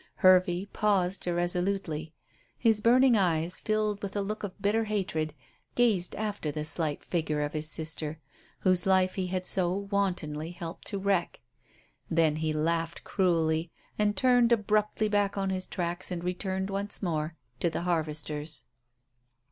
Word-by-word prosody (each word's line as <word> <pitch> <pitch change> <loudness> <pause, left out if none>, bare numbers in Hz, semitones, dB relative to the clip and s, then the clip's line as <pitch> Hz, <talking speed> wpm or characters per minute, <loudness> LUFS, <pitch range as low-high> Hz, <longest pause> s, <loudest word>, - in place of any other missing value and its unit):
Hervey 185 0 +4
paused 195 -3 0
irresolutely. 175 -2 -1 0.5
His 225 -3 +3
burning 245 +2 +5
eyes, 175 -3 +1
filled 215 -1 0
with 200 0 -5
a 205 - +1
look 215 +2 -4
of 205 -2 -6
bitter 215 +3 +1
hatred, 180 -8 -2 0.4
gazed 215 -8 +2
after 205 -6 -2
the 150 +1 -3
slight 155 -1 -1
figure 155 -3 -1
of 145 0 -2
his 155 0 -1
sister, 160 -1 -4 0.4
whose 185 0 +3
life 185 -1 +4
he 185 -2 -2
had 185 0 -2
so 180 -2 +1
wantonly 185 -6 -1
helped 170 -1 -7
to 200 - -2
wreck. 195 -3 0 0.7
Then 160 -2 +3
he 155 0 0
laughed 165 +2 -1
cruelly 165 -3 +1 0.3
and 205 -1 +2
turned 245 0 +4
abruptly 215 -1 +2
back 205 -1 +1
on 195 -1 0
his 185 0 -3
tracks 175 -1 -3
and 175 -2 -4
returned 190 +2 -2
once 200 +1 -2
more 160 -2 -1 0.2
to 170 - +2
the 160 - -3
harvesters. 155 -3 -2
185 Hz, 150 wpm, -29 LUFS, 160-200 Hz, 0.7 s, burning